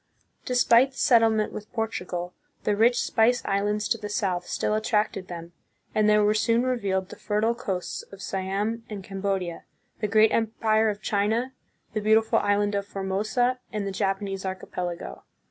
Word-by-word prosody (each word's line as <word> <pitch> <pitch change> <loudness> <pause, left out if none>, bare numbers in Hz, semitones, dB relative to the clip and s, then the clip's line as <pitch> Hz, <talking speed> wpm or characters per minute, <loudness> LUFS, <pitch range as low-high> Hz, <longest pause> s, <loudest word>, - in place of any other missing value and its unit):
Despite 250 +1 +4
the - - -16
settlement 225 -3 +3
with 210 0 -8
Portugal, 180 -6 -3 0.3
the 210 - +1
rich 235 +3 +4
Spice 235 +2 +2
Islands 205 +1 0
to 230 - +1
the 210 -1 -6
south 185 -4 -1
still - - -1
attracted 215 -3 0
them, 170 0 -8 0.4
and 215 0 +3
there 210 0 +5
were 210 +1 +4
soon 230 +2 +2
revealed 200 -7 -1
the - - -9
fertile 215 +2 0
coasts 190 -6 -4
of 195 - -11
Siam 195 +4 -2
and 205 -3 -6
Cambodia, 195 -3 -3 0.4
the 210 - 0
great 215 +1 +5
empire 220 -1 +2
of 205 0 -5
China, 220 +5 0 0.4
the 215 - -1
beautiful 220 +1 +4
island 205 0 +1
of 200 0 -2
Formosa, 215 +6 0
and 210 -3 -3
the 195 - -2
Japanese 195 0 -2
archipelago. 180 -2 -5
210 Hz, 160 wpm, -26 LUFS, 195-225 Hz, 0.4 s, there